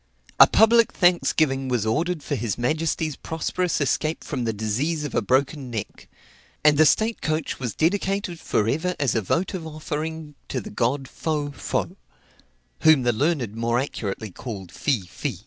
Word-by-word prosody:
A - - +11
public 230 +1 +5
thanksgiving 155 -6 +2
was 120 -4 0
ordered 160 +8 0
for - - -3
his 110 -3 -2
majesty's 155 +4 -1
prosperous 165 +2 -2
escape 155 +3 0
from 130 -5 -3
the 115 - +1
disease 120 +10 -1
of 145 - -5
a - - +2
broken 135 +1 0
neck; 110 -4 -6 0.6
and 150 -1 +6
the 155 +1 +6
state 220 +9 +1
coach 155 0 -2
was 120 -5 -4
dedicated 190 +1 0
for 105 - 0
ever 170 +9 0
as 140 -6 +1
a 115 - +1
votive 170 - -1
offering 155 0 -5 0.2
to 130 - -2
the 110 - -8
god 130 +5 0
Fo, 150 0 -2
Fo 140 - -3 0.8
whom 155 -5 +5
the 120 0 +2
learned 130 -4 0
more 115 +1 0
accurately 110 -5 -4
called 95 -4 -7
Fi, 135 -8 0
Fi. 90 - -5
145 Hz, 165 wpm, -24 LUFS, 120-160 Hz, 0.8 s, A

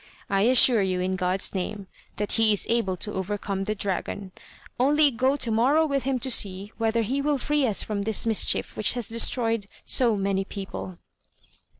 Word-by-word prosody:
I 195 0 +2
assure 250 -3 +5
you, 185 -1 -1
in 185 +1 -1
God's 185 0 -1
name, 195 +1 -4 0.3
that 210 - -3
he 225 -1 +4
is 205 - +2
able 210 -6 0
to 210 - -3
overcome 195 0 -3
the 215 - -2
dragon, 195 0 -4 0.5
only 290 +3 +4
go 260 +4 0
to 235 -4 +1
morrow 270 +9 +3
with 280 -3 -1
him 270 -1 0
to 260 - +2
see 200 -2 +1
whether 225 0 0
he 265 +6 -2
will 290 0 0
free 290 +1 0
us 210 - +1
from 210 -2 -3
this 215 +2 +1
mischief 225 -2 0
which 215 - +2
has 240 -4 -3
destroyed 230 -2 0 0.2
so 235 -5 +3
many 195 0 -1
people." 195 -2 -8
215 Hz, 185 wpm, -25 LUFS, 195-250 Hz, 0.5 s, assure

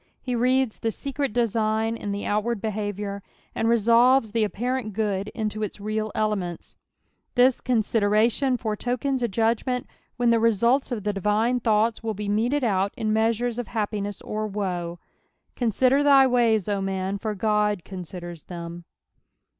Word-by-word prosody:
He 255 - -4
reada 255 0 +1
the 225 - 0
secret 275 +4 -3
design 225 -1 0
in 205 -3 -5
the 200 0 -3
outward 215 +2 0
behaviour, 205 -1 -3 0.3
and 225 - 0
resolves 235 +1 +4
the 225 0 +1
apparent 240 +1 -2
good 200 -2 -1
into 215 -1 -2
its 210 0 -4
real 215 +1 -2
elements. 200 -6 -2 0.6
This 250 0 +4
consideration 230 +2 +2
foretokens 245 +4 -2
a 240 - +2
judg 225 +2 +1
■Dent 250 +2 -3 0.3
when 240 -1 +3
the 230 - +4
results 235 +5 +2
of 220 -5 -3
the 210 0 -1
divine 210 +5 +1
tlioughts 225 -1 +1
will 225 -2 -3
be 210 +1 -5
meted 235 +8 +1
out 200 -3 +1
in 215 -2 0
measures 230 +2 +1
of 245 - -4
ba^piness 205 -2 -3
or 215 0 -2
woe. 180 -4 -3 0.6
Consider 255 +4 +2
thy 280 -2 +6
ways, 235 -5 +2
O 200 -1 0
man, 195 +1 -2
for 215 0 -3
Qod 210 -2 +1
considers 175 -3 -8
them 170 -1 -8
220 Hz, 155 wpm, -25 LUFS, 205-240 Hz, 0.6 s, thy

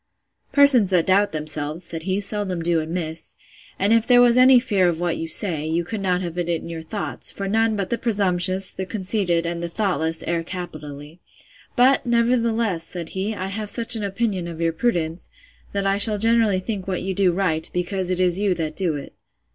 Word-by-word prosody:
Persons 275 -8 +6
that 180 -3 +2
doubt 200 +2 +3
themselves, 155 +1 -4
said 165 -1 -4
he, 190 +3 -1
seldom 200 -4 -2
do 170 -1 +1
amiss: 160 0 -5 0.4
And 200 +3 +2
if 230 0 +2
there 245 -1 +6
was 240 -1 +5
any 255 0 +7
fear 200 -7 +1
of 170 -2 -1
what 175 -1 -1
you 165 - -4
say, 160 -3 0
you 165 +2 0
could 215 +3 -5
not 180 -2 0
have 175 0 -5
it 175 -1 -2
in 165 -1 -2
your 165 -1 -6
thoughts: 200 +6 -5
for 195 - -5
none 225 +2 +1
but 195 -3 -3
the 235 - -1
presumptuous, 190 -4 +1
the 190 0 -6
conceited, 185 -4 +1
and 170 0 -3
the 170 - -4
thoughtless, 165 -4 -1
err 170 0 -1
capitally. 155 -3 -8 0.6
But, 260 +2 +4
nevertheless, 235 -6 +1
said 170 -1 -6
he, 200 +3 -3
I 190 -1 -4
have 210 +1 -4
such 230 +1 0
an 220 - -3
opinion 200 -3 -2
of 165 -1 -8
your 165 -1 0
prudence, 170 -5 -2 0.4
that 200 0 -2
I 195 0 +1
shall 210 +1 +4
generally 225 -3 +2
think 195 -2 -5
what 185 -2 -2
you 190 0 -2
do 185 -1 +2
right, 170 -3 -1
because 180 +1 -2
it 185 -1 -1
is 180 0 +2
you 200 -3 +1
that 155 -2 -4
do 175 -5 0
it. 140 - -8
185 Hz, 205 wpm, -22 LUFS, 170-210 Hz, 0.6 s, any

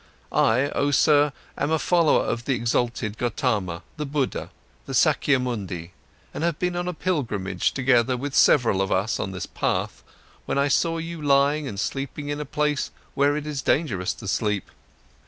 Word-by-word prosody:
I, 130 +6 +2
oh 145 - +1
sir, 145 0 +4 0.2
am 145 - -1
a 160 - +2
follower 170 -1 +3
of 115 0 -2
the 135 - +1
exalted 115 -2 -1
Gotama, 105 - -1
the 150 - -3
Buddha, 140 -2 -2 0.4
the - - -3
Sakyamuni, 105 - +1 0.4
and - - -4
have 170 -3 0
been 180 0 -1
on 175 0 -2
a 180 - -2
pilgrimage 110 - -1
together 130 -2 +2
with 140 +2 -4
several 115 -10 +4
of 95 - -1
us 100 +4 0
on - - -2
this 95 -2 -5
path, - - -2 0.5
when - - -1
I 140 +1 +2
saw 165 +4 +2
you 165 0 -5
lying 145 +1 +3
and 100 -6 -5
sleeping 140 +5 -3
in 145 0 -2
a 150 - -4
place 150 0 -1 0.2
where 145 +1 +2
it 150 - -4
is 150 -3 -3
dangerous 120 - 0
to 100 - -9
sleep. 105 0 -1
135 Hz, 175 wpm, -24 LUFS, 110-150 Hz, 0.5 s, sir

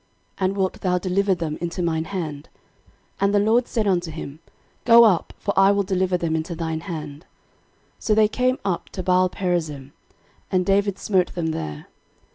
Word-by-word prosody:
And 190 +1 0
wilt 190 -1 -1
thou 180 -1 +1
deliver 190 +2 +1
them 165 -3 -4
into 175 +1 -3
mine 160 -1 -1
hand? 160 -6 -5 0.7
And 200 +1 +2
the - - +5
LORD 225 +4 +2
said 225 -3 -1
unto 180 -4 +1
him, 155 -2 -8 0.4
Go 235 -1 +8
up; 200 -7 +3
for 200 - -2
I 195 0 +6
will 200 0 +2
deliver 185 -1 0
them 165 -2 -1
into 165 +2 -3
thine 160 -1 -3
hand. 155 -4 -7 0.7
13:014:011 - - -16
So 215 - +3
they 215 0 +5
came 255 +4 0
up 185 -4 -2
to 185 - -4
Baalperazim; 175 -6 0 0.6
and 185 -2 +1
David 200 0 +1
smote 185 -4 0
them 165 -2 -1
there. 75 - -5
180 Hz, 175 wpm, -23 LUFS, 160-200 Hz, 0.7 s, Go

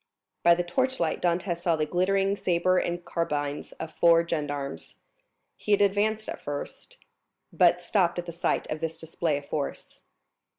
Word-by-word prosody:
By 170 0 +6
the 175 - -1
torchlight 175 -1 0
Dantès 175 0 0
saw 170 -2 +2
the 155 -1 0
glittering 195 +4 +1
sabres 185 -1 +2
and 175 0 -4
carbines 145 -3 -2
of 160 0 -7
four 170 +1 +4
gendarmes. 145 -4 -4 0.6
He 210 - 0
had 205 - +4
advanced 210 +2 +1
at - - -6
first, 145 0 -7 0.6
but 175 0 +4
stopped 175 -1 +1
at 175 - -3
the 170 - -6
sight 170 - -1
of 155 - -2
this 165 0 -3
display 160 -2 -2
of 145 - -8
force. 145 -1 -5
170 Hz, 160 wpm, -27 LUFS, 160-185 Hz, 0.6 s, By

